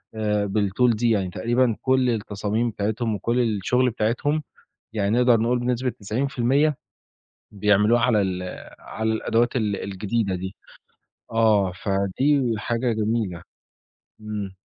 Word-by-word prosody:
آآ 105 -1 0
بالTool 110 +4 +2
دي، 120 +2 +1
يعني 100 -5 +1
تقريبًا 120 +6 +1
كل 130 -1 +2
التصاميم 110 +1 -1
بتاعتهم 110 +2 -2
وكل 115 +5 -1
الشُغل 120 +3 +1
بتاعتهم، 120 +7 -1 0.5
يعني 100 -2 0
نقدر 120 -2 +4
نقول 120 +2 +1
بنسبة 125 +1 -1
90% 130 +6 0 0.7
بيعملوها 105 +3 +3
على 115 -4 +3
ال 90 -1 -2 0.4
على 110 0 -3
الأدوات 115 +2 +1
ال 105 -4 0
الجديدة 100 +1 -2
دي. 95 +2 -5 0.8
آه، 110 -4 +3
فدي 115 +7 +1
حاجة 120 +2 -1
جميلة. 110 -5 -1 0.8
إمم. 105 -3 -5
110 Hz, 120 wpm, -23 LUFS, 100-120 Hz, 0.8 s, نقدر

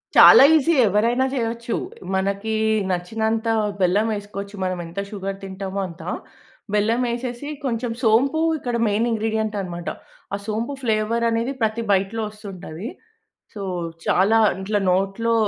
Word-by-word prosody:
చాలా - - +10
ఈసీ 320 +3 +3
ఎవరైనా 230 +6 +2
జెయొచ్చు. 235 -2 -2 0.4
మనకి 200 +3 -1 0.4
నచ్చినంత 220 +5 -1 0.3
బెల్లమేసుకోవచ్చు 205 +1 -1
మనం 185 -1 -2
ఎంత 165 +3 -6
షుగర్ 195 -1 -4
తింటామో 195 0 -5
అంత. 170 -1 -11 0.7
బెల్లమేసేసి 240 +4 0 0.2
కొంచెం 240 -2 -1
సోంపు 265 +8 +3 0.2
ఇక్కడ 245 -4 -3
మెయిన్ 210 +3 +1
ఇంగ్రీడియెంట్ 220 -1 -1
అన్నమాట 175 -2 -5 0.5
ఆ - - -3
సోంపు 225 +5 -2
ఫ్లేవర్ 225 0 +1
అనేది 230 +3 0
ప్రతి 220 +1 0
బైట్‌లో 195 +4 +1
వస్తుంటది. 195 -3 -8 0.7
సో 205 - -7 0.4
చాలా 200 +5 +4 0.2
ఇట్లా 205 +2 0
నోట్లో 195 +5 +1
215 Hz, 115 wpm, -22 LUFS, 195-230 Hz, 0.7 s, చాలా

